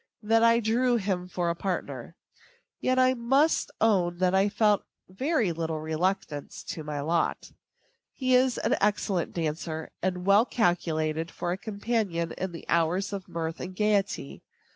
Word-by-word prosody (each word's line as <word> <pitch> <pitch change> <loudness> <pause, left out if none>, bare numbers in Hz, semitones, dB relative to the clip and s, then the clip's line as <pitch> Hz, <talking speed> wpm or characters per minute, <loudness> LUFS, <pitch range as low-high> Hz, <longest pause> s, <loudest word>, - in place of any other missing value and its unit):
that 225 +2 +3
I 230 0 +5
drew 240 +3 +2
him 190 -5 -1
for 175 -2 -1
a - - -3
partner. 185 +1 -4 0.6
Yet 255 0 +1
I 255 0 +5
must 270 +6 +2
own 185 -6 +2
that 185 0 +2
I 195 +2 +3
felt 210 -1 +3 0.3
very 235 - 0
little 160 -1 -3
reluctance 160 -1 -2
to 160 - -5
my 150 -1 -4
lot. 165 +3 -1 0.6
He 255 -1 0
is 255 0 +4
an - - +1
excellent 200 -3 +1
dancer, 160 -1 -3
and 180 0 -2
well 205 +5 +5
calculated 165 -5 0
for 175 - -4
a - - 0
companion 200 -6 -2
in 190 -1 -4
the 165 - -9
hours 170 +5 +1
of 195 -2 -5
mirth 165 0 -4
and 185 +1 -6
gayety. 200 - 0
185 Hz, 155 wpm, -27 LUFS, 165-220 Hz, 0.6 s, I